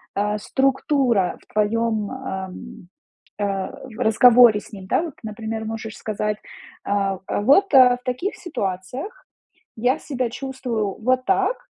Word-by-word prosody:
а, 210 +1 0
структура 265 - +1
в - - -26
твоём, 215 0 0
ам, 190 -8 -5 0.9
а, 195 -2 -1 0.3
разговоре 240 -1 +6
с 215 - -16
ним, 190 -2 -9
да, 320 - +1
вот? 330 -4 -6
Например, 220 +1 -5
можешь 220 0 -5
сказать, 210 0 -3 0.5
а: 195 -2 0
"А - - -1
вот, 295 - +4
а, 255 -2 +8
в 250 - -25
таких 255 +11 -2
ситуациях 255 - -5 0.5
я 245 +4 +1
себя 255 -4 -3
чувствую 245 -6 -4
вот 255 +2 +2
так, 385 - +2
225 Hz, 135 wpm, -22 LUFS, 205-260 Hz, 0.9 s, а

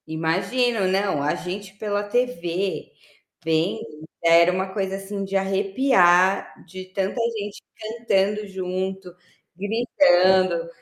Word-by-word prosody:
Imagino. 195 +8 0
Não, 190 -4 0
a 145 +1 0
gente 195 +2 -7
pela 205 -1 -2
tv, 200 -5 -2 0.5
vendo, 160 +3 0 0.4
era 170 +1 +6
uma 190 +1 -3
coisa 195 -1 -2
assim 195 0 -5
de 195 0 -3
arrepiar, 195 -1 +3
de 185 +2 -9
tanta 190 +4 -3 0.2
gente 205 -1 -6 0.2
cantando 210 -2 -1
junto, 190 -1 -5 0.4
gritando, 185 - +3
190 Hz, 105 wpm, -23 LUFS, 180-205 Hz, 0.5 s, era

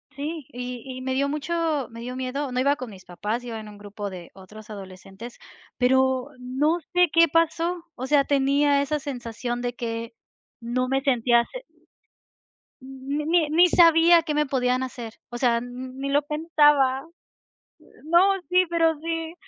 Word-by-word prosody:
Sí, 295 0 -5
y 245 -1 -6 0.2
y - - -7
me 260 0 -2
dio 280 +2 0
mucho 305 -1 -1
me 230 - -10
dio 250 +2 -6
miedo, 260 +2 -3
no 250 - -1
iba 280 +2 +3
con 255 -5 -7
mis 190 -3 -13
papás, 210 +7 -4
yo 245 - -7
iba 225 -1 -5
en 215 -1 -9
un 205 - -13
grupo 205 0 -7
de 180 -3 -10
otros 210 +3 -14
adolescentes, 195 +3 -10 0.4
pero 260 0 +2
no 275 +7 0
sé 360 -1 +4
qué 335 0 +6
pasó, 330 +2 0
o 260 +1 -5
sea, 285 0 +4
tenía 280 +1 +2
esa 300 +2 -1
sensación 240 -3 -5
de 245 0 -2
que 230 -1 -5 0.5
no 245 +2 -1
me 270 +1 0
sentía, 240 -3 +3
se. - - -8 1.2
Ni 290 +5 -1
ni 340 +4 +5
sabía 335 0 +6
qué 305 - -2
me 300 0 +2
podían 255 -2 0
hacer, 240 -3 -7
o 240 - -6
sea, 240 -2 +2
ni 255 +2 -6
lo 285 +1 +3
pensaba. 295 -3 +2 1.0
No, 335 +2 +4 0.3
sí, 365 0 +5
pero 330 -2 +2
sí, 330 0 -4
265 Hz, 165 wpm, -24 LUFS, 240-305 Hz, 1.2 s, qué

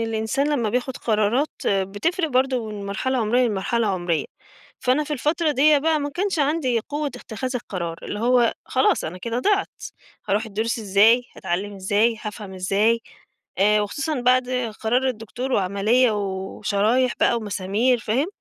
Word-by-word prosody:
الإنسان 225 +5 -1
لمّا 240 -7 0
بياخُد 250 +2 -2
قرارات 225 +6 +1 0.2
بتفرق 205 - 0
برضه 255 -3 +1
من 205 -2 -6
مرحلة 255 +7 -1
عُمرية، 240 +3 +2
لمرحلة 225 +2 0
عُمرية. 175 -5 0 0.6
فأنا 260 +4 +2
في 300 - -5
الفترة 305 +4 0
ديّة 295 +1 +5
بقى 315 +1 +1
ما 285 0 -3
كانش 375 +3 -1
عندي 280 -5 +1
قوة 295 +1 -2
اتِّخاذ 255 -1 -6
القرار، 170 -8 -4
اللي 205 - -5
هو 240 0 +3
خلاص، 260 - +1
أنا 165 +4 -5
كده 230 +5 -3
ضِعت، 400 +7 0 0.5
هاروح 205 +2 +1
الدروس 220 +3 -2
إزاي، 215 +4 +4
هاتعلّم 195 +2 -3
إزاي، 205 +4 +1
هافهم 210 -3 -7
إزاي. 200 +5 +1 0.6
آآ 210 +2 +4
وخصوصًا 275 +7 -2
بعد 250 +1 +3 0.3
قرار 250 +4 +1
الدكتور 245 +2 -4
وعملية 205 +6 +2
و 195 -2 -4
وشرايح 220 +5 +2
بقى - - +4
ومسامير 215 +3 0
فاهم؟ 230 +7 0
230 Hz, 150 wpm, -23 LUFS, 205-260 Hz, 0.6 s, ديّة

